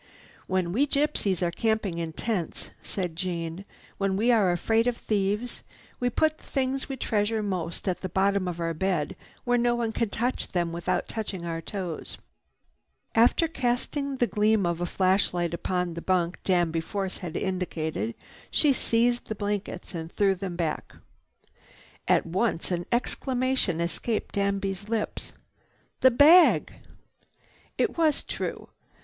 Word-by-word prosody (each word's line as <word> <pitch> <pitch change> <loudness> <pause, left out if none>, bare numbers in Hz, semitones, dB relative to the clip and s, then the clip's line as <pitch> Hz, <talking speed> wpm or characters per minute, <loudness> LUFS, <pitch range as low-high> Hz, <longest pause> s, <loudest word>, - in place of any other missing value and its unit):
"When 185 -2 0
we 265 +10 +2
gypsies 270 - +1
are 170 - +1
camping 215 -3 0
in 165 -1 -3
tents," 195 -3 -3
said 180 -4 -3
Jeanne, 170 +1 -4 0.3
"when 195 -1 +1
we 235 +4 +3
are 210 -6 +4
afraid 225 +7 +2
of 245 -1 +1
thieves, 210 +3 -1 0.4
we 245 - +1
put 310 +5 +1
the - - -21
things 270 0 -1
we 270 - -3
treasure 215 -1 0
most 180 -3 -3
at 185 - 0
the 185 - -3
bottom 195 +1 +2
of 175 -1 -4
our 165 0 -1
bed 175 -3 -1 0.3
where 245 0 +2
no 240 0 +3
one 235 -2 -1
can 230 -1 -1
touch 245 +5 -1
them 175 -2 -1
without 175 +1 -1
touching 200 -6 -4
our 165 -1 -3
toes." 180 -2 -5 1.0
After 240 +8 +4
casting 270 0 -1
the 245 - +3
gleam 215 -3 +2
of 170 0 -1
a 175 - 0
flashlight 185 -2 +1
upon 180 0 -1
the 170 - -5
bunk 180 -1 0
Danby 170 -3 +2
Force 190 +2 -4
had 175 -4 -5
indicated, 160 - -2 0.3
she 295 -3 +4
seized 240 0 +1
the 220 - -3
blankets 205 -1 -3
and 165 -1 -5
threw 200 -2 +3
them 185 -1 -5
back. 165 -3 -2 1.1
At - - +4
once 185 +1 0
an 175 -1 -2
exclamation 255 - 0
escaped 175 +6 -2
Danby's 200 0 -1
lips: 225 -2 -3 0.7
"The 260 - +7
bag!" 305 +8 +6 1.0
It - - 0
was 310 -3 +3
true. - - -4
195 Hz, 150 wpm, -27 LUFS, 175-235 Hz, 1.1 s, The